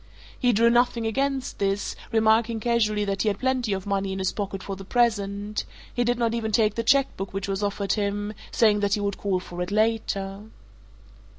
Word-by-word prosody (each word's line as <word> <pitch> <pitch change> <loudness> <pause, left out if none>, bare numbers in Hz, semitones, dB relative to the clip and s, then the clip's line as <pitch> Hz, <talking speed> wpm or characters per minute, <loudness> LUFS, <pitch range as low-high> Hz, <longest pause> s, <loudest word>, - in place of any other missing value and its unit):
He 245 -2 +3
drew 230 +1 +4
nothing 240 -1 +2
against 270 +3 -1
this, 195 0 -1 0.2
remarking 225 0 +3
casually 215 -3 +1
that 195 -1 -1
he - - 0
had 200 -2 +1
plenty 255 -2 0
of 190 -1 -2
money 195 -1 -1
in - - -4
his 190 -1 0
pocket 195 -2 -4
for 195 - -4
the 195 - -9
present: 205 -2 0 0.3
he 245 - +1
did 240 0 +1
not 230 -1 +1
even 225 -2 -2
take 215 0 +3
the 230 - -1
cheque 275 +4 +3
book 195 0 -5
which 195 0 -2
was 195 0 -2
offered 200 -1 -1
him, 205 0 -2 0.2
saying 210 -2 +3
that 205 -1 +2
he - - -3
would 200 -1 -2
call 195 -2 0
for 175 -1 -7
it 180 - -2
later. 205 -2 0
210 Hz, 205 wpm, -25 LUFS, 200-230 Hz, 0.3 s, drew